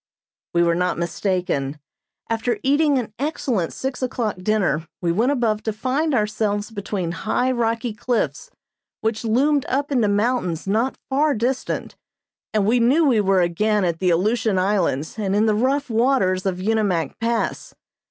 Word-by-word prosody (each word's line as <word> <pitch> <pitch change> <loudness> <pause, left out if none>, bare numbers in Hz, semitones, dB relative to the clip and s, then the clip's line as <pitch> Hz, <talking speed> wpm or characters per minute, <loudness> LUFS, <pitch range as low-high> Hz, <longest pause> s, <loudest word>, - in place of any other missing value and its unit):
We 170 - +4
were 170 0 +3
not 180 +1 0
mistaken. 170 -4 -1 0.5
After 230 +1 -1
eating 285 +1 +3
an 225 -4 -3
excellent 260 - -1
six 265 -1 -4
o'clock 240 -5 -2
dinner 180 -6 0
we 170 -2 0
went 230 +10 +2
above 230 -6 0
to 220 - -2
find 265 +7 0
ourselves 210 -1 -1
between 200 -4 -3
high, 250 +9 0
rocky 230 -1 -1
cliffs, 245 - -2 0.5
which 220 0 -1
loomed 270 +6 +2
up 280 +2 -1
into 240 -6 +2
mountains 205 -5 0
not 225 +7 0
far 290 +2 +2
distant, 245 +4 -2 0.6
and 210 -2 +1
we 235 +4 +3
knew 270 +8 +4
we 240 -7 +4
were 195 -2 +3
again 205 +4 +1
at 170 -2 -1
the 185 - +2
Aleutian 215 +4 +1
Islands 185 -3 0
and 195 -2 0
in 210 +2 +3
the 215 - +3
rough 265 +6 +1
waters 225 -6 +1
of 185 -2 -1
Unimak 195 -5 0
Pass. 230 0 -2
215 Hz, 155 wpm, -22 LUFS, 185-250 Hz, 0.6 s, We